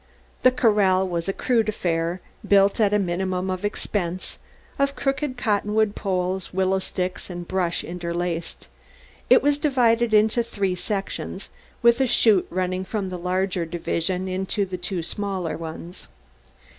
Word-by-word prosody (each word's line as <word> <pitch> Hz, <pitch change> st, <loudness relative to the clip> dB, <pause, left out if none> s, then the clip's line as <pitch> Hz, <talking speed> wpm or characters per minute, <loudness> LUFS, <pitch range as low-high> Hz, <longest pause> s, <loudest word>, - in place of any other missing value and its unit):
The 255 Hz, -, +7 dB
corral 205 Hz, -6 st, +3 dB
was 170 Hz, 0 st, -2 dB
a -, -, 0 dB
crude 230 Hz, -2 st, +1 dB
affair, 170 Hz, -3 st, -1 dB, 0.3 s
built 200 Hz, +1 st, +4 dB
at 210 Hz, -2 st, +4 dB
the 210 Hz, -, +2 dB
minimum 185 Hz, 0 st, -1 dB
of 185 Hz, +1 st, -4 dB
expense, 185 Hz, -3 st, -3 dB, 0.4 s
of 280 Hz, 0 st, +1 dB
crooked 270 Hz, 0 st, -1 dB
cottonwood 210 Hz, -1 st, +1 dB
poles, 185 Hz, -2 st, -2 dB
willow 190 Hz, +1 st, +1 dB
sticks 185 Hz, -1 st, -4 dB
and 175 Hz, -1 st, -6 dB
brush 180 Hz, -2 st, -1 dB
interlaced. 170 Hz, -1 st, -4 dB, 0.6 s
It -, -, +7 dB
was 290 Hz, 0 st, +2 dB
divided 240 Hz, -5 st, +3 dB
into 215 Hz, +2 st, +4 dB
three 200 Hz, -5 st, -1 dB
sections, 195 Hz, +2 st, -4 dB, 0.3 s
with 235 Hz, +2 st, +5 dB
a 265 Hz, -, +3 dB
chute 215 Hz, -5 st, +4 dB
running 185 Hz, +1 st, -1 dB
from 195 Hz, -1 st, -3 dB
the 180 Hz, -1 st, -5 dB
larger 185 Hz, 0 st, 0 dB
division 175 Hz, +2 st, -2 dB
into 190 Hz, +2 st, -1 dB
two 180 Hz, -1 st, -4 dB
smaller 185 Hz, -4 st, -3 dB
ones. 165 Hz, +2 st, -8 dB
190 Hz, 140 wpm, -24 LUFS, 180-215 Hz, 0.6 s, The